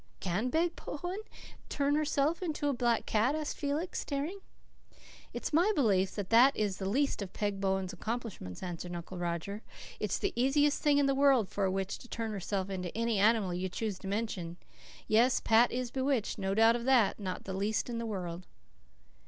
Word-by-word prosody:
"Can 195 Hz, +7 st, -1 dB
Peg 335 Hz, +5 st, +1 dB
Bowen 355 Hz, +7 st, -5 dB, 0.5 s
turn 285 Hz, 0 st, +1 dB
herself 300 Hz, +2 st, +1 dB
into 310 Hz, -4 st, -2 dB
a 285 Hz, -, +2 dB
black 240 Hz, -2 st, +1 dB
cat?" 230 Hz, +7 st, +2 dB
asked 310 Hz, -1 st, -3 dB
Felix, 295 Hz, +5 st, -2 dB
staring. 295 Hz, +7 st, -3 dB, 0.9 s
"It's -, -, -4 dB
my 350 Hz, +7 st, +4 dB
belief 195 Hz, -8 st, +2 dB
that 205 Hz, -1 st, -4 dB
that 250 Hz, +5 st, +6 dB
is 205 Hz, -3 st, 0 dB
the 190 Hz, -1 st, -2 dB
least 275 Hz, +2 st, +1 dB
of 195 Hz, -2 st, -6 dB
Peg 205 Hz, -2 st, -2 dB
Bowen's 190 Hz, -1 st, 0 dB
accomplishments," 215 Hz, -, -5 dB
answered 175 Hz, 0 st, -5 dB
Uncle 175 Hz, +1 st, -7 dB
Roger. 175 Hz, +4 st, -3 dB, 0.4 s
"It's -, -, -1 dB
the 400 Hz, -, -1 dB
easiest 280 Hz, +4 st, +2 dB
thing 295 Hz, -2 st, +4 dB
in 285 Hz, -, +4 dB
the 275 Hz, -, +3 dB
world 270 Hz, -6 st, +4 dB
for 200 Hz, -, -1 dB
a 190 Hz, -, +1 dB
witch 195 Hz, 0 st, -2 dB
to -, -, -13 dB
turn 225 Hz, -2 st, -3 dB
herself 195 Hz, -1 st, -3 dB
into 180 Hz, -2 st, -3 dB
any 230 Hz, -2 st, +1 dB
animal 210 Hz, -3 st, +3 dB
you 185 Hz, +1 st, -2 dB
choose 205 Hz, 0 st, -3 dB
to 195 Hz, -, -8 dB
mention. 195 Hz, -5 st, -3 dB, 0.5 s
Yes, 235 Hz, +4 st, +4 dB
Pat 230 Hz, +2 st, +4 dB
is 250 Hz, -1 st, -3 dB
bewitched 265 Hz, -4 st, 0 dB
no 195 Hz, 0 st, -1 dB
doubt 225 Hz, +2 st, +6 dB
of 240 Hz, 0 st, -3 dB
that 250 Hz, -7 st, +4 dB
not 185 Hz, -3 st, -4 dB
the 190 Hz, -, -5 dB
least 205 Hz, +3 st, -1 dB
in 235 Hz, -1 st, -3 dB
the 230 Hz, -, -3 dB
world." 180 Hz, -4 st, -5 dB
225 Hz, 190 wpm, -31 LUFS, 190-275 Hz, 0.9 s, that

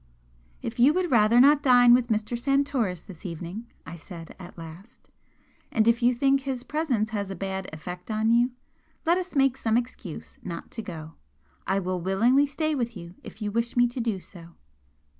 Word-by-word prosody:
"If -, -, -5 dB
you 275 Hz, +6 st, +6 dB
would 365 Hz, -2 st, 0 dB
rather 230 Hz, 0 st, +5 dB
not 285 Hz, +3 st, +6 dB
dine 245 Hz, -3 st, +6 dB
with 245 Hz, -1 st, +4 dB
Mr. 220 Hz, +1 st, -1 dB
Santoris 255 Hz, -, 0 dB
this 185 Hz, -3 st, -12 dB
evening," 180 Hz, +5 st, -6 dB, 0.2 s
I 170 Hz, -, -8 dB
said, 165 Hz, 0 st, -11 dB
at 180 Hz, -1 st, -11 dB
last, 170 Hz, +9 st, -12 dB, 0.6 s
"and 220 Hz, -1 st, +2 dB
if 235 Hz, +1 st, +3 dB
you 240 Hz, +1 st, +5 dB
think 275 Hz, +2 st, +3 dB
his 265 Hz, -2 st, -4 dB
presence 260 Hz, -8 st, -1 dB
has 200 Hz, -3 st, -3 dB
a 195 Hz, -, -5 dB
bad 190 Hz, +1 st, -4 dB
effect 180 Hz, +5 st, -8 dB
on 220 Hz, +1 st, +1 dB
you, 240 Hz, +1 st, +4 dB, 0.6 s
let 340 Hz, +3 st, +3 dB
us 365 Hz, -3 st, -6 dB
make 270 Hz, -2 st, +3 dB
some 225 Hz, -3 st, +1 dB
excuse 235 Hz, -8 st, -6 dB
not 170 Hz, -2 st, -7 dB
to -, -, -5 dB
go. 160 Hz, -5 st, -8 dB, 0.5 s
I 195 Hz, -, +1 dB
will 185 Hz, -2 st, -2 dB
willingly 235 Hz, +10 st, +3 dB
stay 310 Hz, +2 st, -1 dB
with 235 Hz, -5 st, -2 dB
you, 170 Hz, 0 st, -10 dB
if 215 Hz, -, -9 dB
you 205 Hz, -, -2 dB
wish 230 Hz, +3 st, -1 dB
me 245 Hz, -, +6 dB
to 245 Hz, -, -6 dB
do 225 Hz, -5 st, -1 dB
so." 170 Hz, -3 st, -14 dB
230 Hz, 190 wpm, -26 LUFS, 185-255 Hz, 0.6 s, you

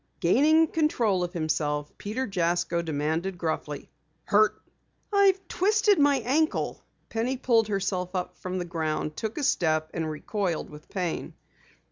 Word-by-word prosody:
Gaining 300 Hz, -, +5 dB
control 240 Hz, -, +1 dB
of 175 Hz, +1 st, -4 dB
himself, 150 Hz, -3 st, -1 dB
Peter 225 Hz, +6 st, -2 dB
Jasko 175 Hz, -3 st, 0 dB
demanded 160 Hz, +4 st, -2 dB
gruffly: 155 Hz, -3 st, -4 dB, 0.3 s
"Hurt?" 215 Hz, +1 st, +3 dB, 0.5 s
"I've 390 Hz, -2 st, +4 dB
twisted 415 Hz, +1 st, +3 dB
my 285 Hz, -2 st, +4 dB
ankle." 310 Hz, +5 st, 0 dB, 0.3 s
Penny 240 Hz, +4 st, -1 dB
pulled 230 Hz, -4 st, +3 dB
herself 190 Hz, -2 st, -2 dB
up 180 Hz, -1 st, -3 dB
from 185 Hz, 0 st, -4 dB
the 180 Hz, -, -2 dB
ground, 155 Hz, -2 st, -2 dB
took 220 Hz, +4 st, -4 dB
a 300 Hz, -, -2 dB
step, 155 Hz, -, +1 dB
and 160 Hz, -2 st, -2 dB
recoiled 175 Hz, +2 st, -3 dB
with 150 Hz, +1 st, -13 dB
pain. 180 Hz, -4 st, -3 dB
185 Hz, 135 wpm, -27 LUFS, 165-260 Hz, 0.5 s, Gaining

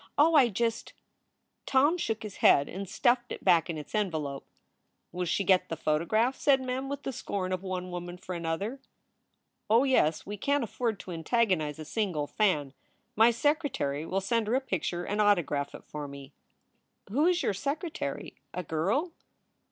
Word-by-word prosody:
Oh, 315 Hz, +3 st, +5 dB
I 270 Hz, -6 st, +6 dB
just" 230 Hz, +2 st, -2 dB, 0.7 s
Tom 285 Hz, +5 st, +4 dB
shook 225 Hz, -11 st, -2 dB
his 210 Hz, -2 st, -7 dB
head 140 Hz, +1 st, +5 dB
and 195 Hz, 0 st, -6 dB
stuffed 240 Hz, +4 st, +1 dB
it -, -, -7 dB
back 175 Hz, -3 st, +4 dB
in 165 Hz, -, -3 dB
its 150 Hz, -, -9 dB
envelope. 155 Hz, -10 st, -2 dB, 0.6 s
"Will 180 Hz, +1 st, -3 dB
she 200 Hz, -, +1 dB
get 185 Hz, -1 st, +3 dB
the 165 Hz, -, -3 dB
photograph?" 215 Hz, -, +1 dB
said 275 Hz, -2 st, +4 dB
Mem, 260 Hz, +1 st, -3 dB
with 280 Hz, 0 st, -5 dB
the -, -, -2 dB
scorn 190 Hz, -6 st, -3 dB
of 185 Hz, -, -2 dB
one 185 Hz, -1 st, -4 dB
woman 175 Hz, 0 st, -6 dB
for 180 Hz, 0 st, -7 dB
another. 175 Hz, +9 st, -3 dB, 0.9 s
"Oh 230 Hz, +4 st, +5 dB
yes. 210 Hz, -, +2 dB
We 205 Hz, +1 st, -5 dB
can 285 Hz, +7 st, +1 dB
t -, -, -1 dB
afford 230 Hz, -2 st, -2 dB
to 185 Hz, -, -9 dB
antagonize 170 Hz, -3 st, 0 dB
a 155 Hz, -, -7 dB
single 180 Hz, -6 st, -1 dB
fan. 150 Hz, -7 st, 0 dB, 0.4 s
My 225 Hz, +2 st, +6 dB
secretary 240 Hz, -, 0 dB
will 190 Hz, +4 st, -1 dB
send 225 Hz, +2 st, 0 dB
her 230 Hz, -, +1 dB
a -, -, +4 dB
picture 180 Hz, -, -2 dB
and 205 Hz, +1 st, 0 dB
autograph 165 Hz, -9 st, +1 dB
it -, -, -11 dB
for 150 Hz, -1 st, -6 dB
me." 140 Hz, 0 st, -11 dB, 0.8 s
"Who 290 Hz, +9 st, +3 dB
is 360 Hz, -1 st, +2 dB
your -, -, +1 dB
secretary 300 Hz, -, -4 dB, 0.2 s
a 180 Hz, -, -3 dB
girl?" 195 Hz, -, 0 dB
200 Hz, 175 wpm, -29 LUFS, 165-250 Hz, 0.9 s, I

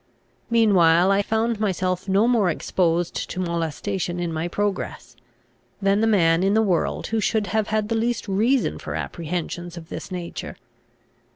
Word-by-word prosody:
Meanwhile 190 Hz, -6 st, +4 dB
I 195 Hz, +1 st, +3 dB
found 220 Hz, +1 st, 0 dB
myself 185 Hz, -2 st, -1 dB
no 200 Hz, +4 st, +3 dB
more 225 Hz, -7 st, +3 dB
exposed 170 Hz, +1 st, -1 dB
to -, -, -5 dB
molestation 175 Hz, +1 st, -2 dB
in 170 Hz, -2 st, -2 dB
my 160 Hz, +2 st, -2 dB
progress, 185 Hz, -10 st, -3 dB, 0.6 s
than 200 Hz, +1 st, +2 dB
the 225 Hz, -, +3 dB
man 165 Hz, -6 st, +3 dB
in 195 Hz, +2 st, +2 dB
the 220 Hz, -, +4 dB
world 185 Hz, -5 st, 0 dB
who 225 Hz, -, +2 dB
should 215 Hz, 0 st, +1 dB
have 220 Hz, 0 st, 0 dB
had 215 Hz, -1 st, 0 dB
the 230 Hz, -, -1 dB
least 230 Hz, +1 st, -1 dB
reason 225 Hz, +7 st, +1 dB
for -, -, -5 dB
apprehensions 175 Hz, +1 st, -4 dB
of 165 Hz, -1 st, -10 dB
this -, -, -7 dB
nature. 175 Hz, -2 st, -6 dB
195 Hz, 160 wpm, -23 LUFS, 175-215 Hz, 0.6 s, Meanwhile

